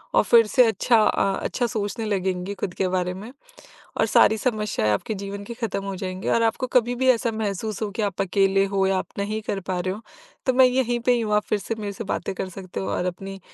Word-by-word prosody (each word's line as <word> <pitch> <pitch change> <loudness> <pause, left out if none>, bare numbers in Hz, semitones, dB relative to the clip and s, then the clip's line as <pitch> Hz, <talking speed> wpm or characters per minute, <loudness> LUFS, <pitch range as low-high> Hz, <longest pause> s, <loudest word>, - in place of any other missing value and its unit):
और - - +5
फिर 230 -2 +5
से 250 +3 +5
अच्छा 225 +2 +3
अ, 195 -2 +2
अच्छा 245 - -1
सोचने 215 0 -3
लगेंगी 190 -2 -1
खुद 180 -2 -4
के 190 - 0
बारे 180 0 -1
में 205 +6 -9 0.7
और - - +4
सारी 220 - +5
समस्याएँ 210 - 0
आपके 105 - -2
जीवन 200 0 -6
की 235 - -7
खत्म 225 -4 -3
हो 195 - -4
जाएँगी। 185 0 -4
और 230 - +3
आपको 230 +3 +1
कभी 240 0 -1
भी 260 +1 +1
ऐसा 230 -1 +1
महसूस 215 -1 -3
हो 210 - -1
कि 210 +2 -3
आप 200 -3 -2
अकेले 195 0 +2
हो 195 -1 +3
या 190 -1 +2
आप - - -3
नहीं 210 +2 -2
कर 200 -2 -3
पा 185 0 -3
रहे 185 +1 -2
हो, 210 - -9 0.5
तो 260 - +4
मैं 260 +1 +6
यहीं 250 -1 +1
पे 245 +1 +3
ही 240 - +2
हूँ 210 -2 0
आप 210 - +3
फिर 210 - +1
से 225 +3 -4
मेरे 210 -2 -5
से 225 - -6
बातें 195 - -3
कर 185 - -4
सकते 185 - -7
हो 95 - -3
और 140 - -1
अपनी 195 +2 -5
200 Hz, 250 wpm, -24 LUFS, 190-225 Hz, 0.7 s, मैं